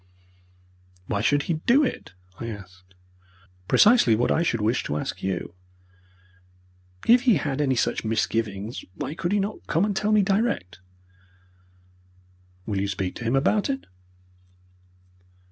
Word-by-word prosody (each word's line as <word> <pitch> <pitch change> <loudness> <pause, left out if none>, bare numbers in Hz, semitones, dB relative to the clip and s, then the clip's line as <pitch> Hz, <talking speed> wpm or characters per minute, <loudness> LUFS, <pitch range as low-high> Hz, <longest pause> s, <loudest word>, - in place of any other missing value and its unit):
"Why 100 0 -2
should 145 +5 +2
he 170 - -1
do 270 +5 +5
it?" 95 - -4 0.2
I 115 - -5
asked. 95 -4 -11 0.7
"Precisely 210 - +5
what 120 +3 +1
I - - +2
should 120 -9 0
wish 110 +4 0
to 75 - -2
ask - - -5
you. 95 -3 -3 1.5
If 240 +1 +6
he 225 - +6
had 145 -2 -1
any 135 -3 +1
such - - 0
misgivings, 110 -1 -2
why - - -4
could 170 +2 -3
he 205 - +2
not 200 +2 -4
come 165 +5 +2
and 205 -2 -2
tell 210 +2 0
me 210 -1 +4
direct?" 195 - -1 1.9
"Will 100 -3 -2
you 100 - -1
speak 95 -1 -3
to - - -7
him 120 +3 0
about 200 - +2
it?" 270 0 -3
130 Hz, 145 wpm, -25 LUFS, -, 1.9 s, If